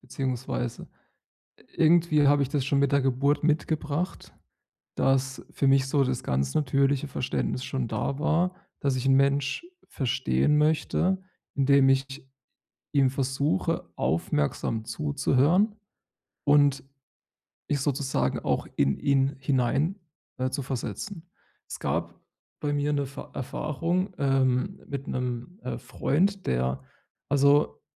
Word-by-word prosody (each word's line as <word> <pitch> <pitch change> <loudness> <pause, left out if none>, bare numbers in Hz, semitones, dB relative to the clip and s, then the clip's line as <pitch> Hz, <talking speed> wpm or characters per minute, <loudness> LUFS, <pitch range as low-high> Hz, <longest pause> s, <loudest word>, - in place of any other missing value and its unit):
beziehungsweise 125 -2 -4 0.9
irgendwie 160 -3 +4
habe 145 0 +4
ich 135 - -4
das 140 -3 0
schon 140 0 +2
mit 140 -1 +2
der 140 - +3
Geburt 135 +3 +1
mitgebracht, 155 +2 -1 0.6
dass 135 0 0
für 140 - 0
mich 135 0 +4
so 140 0 +2
das 130 -1 -2
ganz 65 +1 -1
natürliche 140 0 +1
Verständnis 130 -1 -2
schon 130 -3 -2
da 140 +5 -2
war, 170 +4 +1 0.3
dass 140 -2 +1
ich 130 +1 -2
'n 135 - +5
Mensch 140 - +1 0.2
verstehen 130 - +1
möchte, 160 +5 +2 0.4
indem 140 -1 +4
ich 135 +1 0 0.7
ihm 135 -3 +4
versuche, 135 -4 -1
aufmerksam 80 +7 -1
zuzuhören, 145 - +2 0.7
und 145 -1 +4 0.9
mich 145 - +1
sozusagen 140 -2 0
auch - - -1
in 70 -1 +2
ihn 140 -1 +2
hinein 135 +7 +1 0.4
äh, 130 0 0
zu 140 - -3
versetzen. 140 - -5 0.4
Es - - -7
gab - - -2 0.4
bei 145 -1 -1
mir 145 +1 0
'ne 140 -1 0
Ver 140 - -9
Erfahrung, 165 +8 -2
ähm, 135 +6 +1
mit 140 -1 -5
'nem, 125 - -4
äh, 120 -2 -4
Freund, 190 - 0
der 65 +2 0 0.5
also, 145 +1 +3
140 Hz, 120 wpm, -27 LUFS, 130-150 Hz, 0.9 s, n